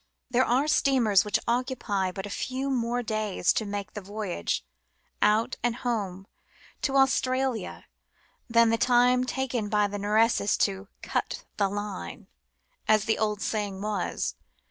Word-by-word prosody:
There 255 +1 +3
are 260 +5 +2
steamers 245 -10 +4
which 210 - +1
occupy 235 -6 0
but 190 +1 -6
a - - -6
few 265 +4 -2
more 245 -1 0
days 215 -5 0
in 210 - -5
making 200 -1 -4
the 210 - -6
voyage, 205 -1 -3 0.6
out 210 +2 +2
and 240 -1 0
home, 200 -7 -3 0.6
to 275 - 0
Australia 260 -2 +1 0.6
than 230 0 +5
the 230 - +1
time 250 0 +4
taken 250 -4 -2
by 210 0 +3
the 205 0 -4
Nereus 210 +1 +2
to 195 -1 0
" - - -44
cut - - -2
the 200 -2 +2
Line," 205 - -5 0.6
as 215 -1 +4
the 220 - +1
old 210 -2 0
saying 205 -3 -2
was. 210 -1 -2
215 Hz, 145 wpm, -27 LUFS, 205-245 Hz, 0.6 s, than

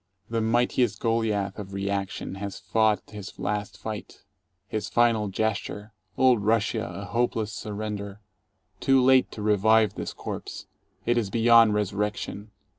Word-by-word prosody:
The 115 -1 0
mightiest 120 +2 +1
Goliath 110 -4 0
of 100 -1 -8
Reaction 100 -1 -3
has 100 -1 -4
fought 110 -2 +1
his 105 -2 -9
last 105 -2 -3
fight 110 -2 -7 0.2
— 90 +3 -50
his 110 - -3
final 115 -3 +3
gesture, 105 +1 -3 0.2
Old 125 -4 +4
Russia, 110 +1 +1
a 100 - -7
hopeless 115 -1 -1
surrender. 105 -1 -5 0.6
Too 135 0 +4
late 130 0 +4
to 105 - -6
revive 110 +1 +4
this - - -5
corpse. - - -7 0.4
It 120 0 +3
is 105 -4 -2
beyond 115 0 +5
resurrection. 105 +1 -2
105 Hz, 135 wpm, -26 LUFS, 100-115 Hz, 0.6 s, beyond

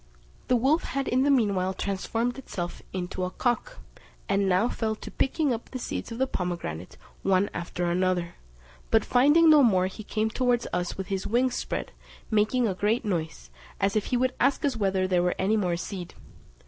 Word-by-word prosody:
The 250 - +3
wolf 270 +7 +3
had 270 0 -2
in 255 +2 +2
the 285 - +3
meanwhile 200 -8 +2
transformed 225 +7 -2
itself 175 -9 -5
into 185 0 -4
a 180 - -1
cock, 245 - -1 0.5
and 195 -1 +2
now 185 +5 +3
fell 220 -3 -2
to - - -10
picking 285 0 +1
up 230 - -6
the 260 - -5
seeds 240 - -5
of 230 - -5
the 265 - +2
pomegranate 170 - -4 0.2
one 195 +1 +2
after 175 +1 -3
another; 175 0 0 0.6
but 225 -2 +3
finding 295 +7 +5
no 305 -2 +8
more, 190 -8 +4
he 190 +3 -6
came 215 +1 -1
towards 245 -1 +1
us 180 0 -2
with 190 +1 -5
his 195 -1 -2
wings 245 +3 +2
spread, - - -3 0.4
making 220 +3 +2
a 195 - 0
great 210 +6 0
noise, 160 - -3 0.3
as 195 +1 +1
if 215 - +1
he 250 - 0
would 255 +1 +1
ask 275 +3 +2
us 275 -3 +1
whether 195 -3 +1
there 180 -1 +2
were 180 0 +1
any 195 +3 +2
more 180 -5 0
seed. 180 -1 -6
210 Hz, 190 wpm, -27 LUFS, 185-245 Hz, 0.6 s, no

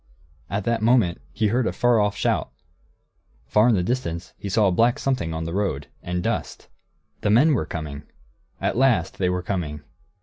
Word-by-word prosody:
At 100 +2 -2
that 115 +1 0
moment, 110 - +3
he 105 - 0
heard 120 +2 +1
a - - 0
far 120 -2 +3
off 105 -1 +1
shout. - - 0 0.9
Far 105 +3 +4
in 115 - +4
the 90 - +1
distance 90 -7 -3
he 100 - -6
saw 105 +2 +3
a - - +3
black 115 +7 +3
something 130 -12 -1
on 80 0 -3
the 85 +1 -4
road, 90 -8 -2
and 90 0 -3
dust. - - -3 0.5
The 105 - 0
men 135 +9 +5
were 100 - 0
coming! 75 -3 -5 0.6
At - - -1
last, 120 -9 +2
they 90 -2 +2
were 90 0 -1
coming. 80 -7 -3
100 Hz, 190 wpm, -23 LUFS, 85-115 Hz, 0.9 s, men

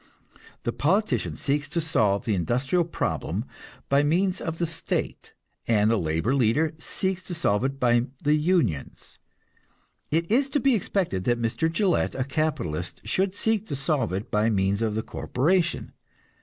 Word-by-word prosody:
The 120 - -1
politician 195 +9 +1
seeks 145 +1 -1
to 170 - -1
solve 110 -11 +1
the 110 - +1
industrial 125 - +1
problem 165 - -2 0.4
by 140 +1 +4
means 180 +6 +1
of 165 -1 -3
the 170 - 0
state, 160 0 -3 0.3
and 110 -1 +3
the 115 - +3
labor 80 +9 0
leader 140 +5 +2
seeks 190 +3 -2
to 175 - -5
solve 105 -10 +1
it 135 0 -2
by 120 -1 +3 0.2
the 150 - +3
unions; 150 - 0 0.9
it 165 +4 0
is 270 +4 +3
to 290 - +1
be 275 0 +3
expected 180 - -1
that 120 -1 +2
Mr. 120 +8 0
Gillette, 180 0 +1
a 130 - 0
capitalist, 130 - -2
should 190 0 0
seek 220 0 0
to 145 - -3
solve 135 - 0
it 95 +4 -4
by 105 +2 +2
means 100 0 +1
of 110 -2 0
the 110 - -1
corporation. 170 +5 0
145 Hz, 160 wpm, -26 LUFS, 110-175 Hz, 0.9 s, by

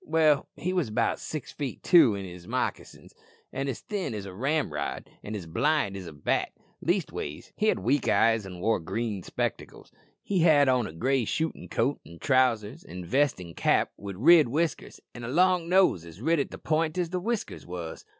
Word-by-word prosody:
Well, 155 -2 +3
he 180 +2 -2
wos 175 -10 0
about 115 +2 0
six 155 -5 -6
feet 140 -4 -5
two 155 - +6
in 100 -1 -5
his 90 -1 -10
moccasins, - - -4 0.4
an' 135 +1 -2
as 135 - -4
thin 195 - -3
as 100 -2 -5
a 95 - -8
ramrod, 125 - -2 0.2
an' 105 - -5
as 95 -5 -6
blind 140 - +1
as 95 -2 -7
a - - -7
bat 75 -1 -1 0.3
leastways 75 - -2
he 215 - 0
had - - +3
weak 125 +9 0
eyes 115 -1 +3
an' 90 -2 -9
wore 110 +1 +2
green 100 +4 -3
spectacles. - - -4 0.3
He 195 -2 0
had 155 -4 +5
on 125 -4 +2
a - - -8
gray 130 +9 0
shootin' 160 - -3
coat 130 +9 0
an' 85 +2 -13
trousers 120 -3 +1
an' 90 +1 -8
vest 135 +3 +2
an' 85 -2 -9
cap, - - +2
with 100 -1 -7
rid 155 - +6
whiskers 155 +6 -2
an' 120 - -9
a - - -4
long 175 +4 +2
nose 185 - +4
as 85 +1 -12
rid 160 +6 +2
at 140 - -1
the - - -8
point 155 +1 0
as 175 -2 -1
the 185 - -1
whiskers 225 +3 -3
wos." 85 -2 -6
125 Hz, 200 wpm, -27 LUFS, 95-160 Hz, 0.4 s, two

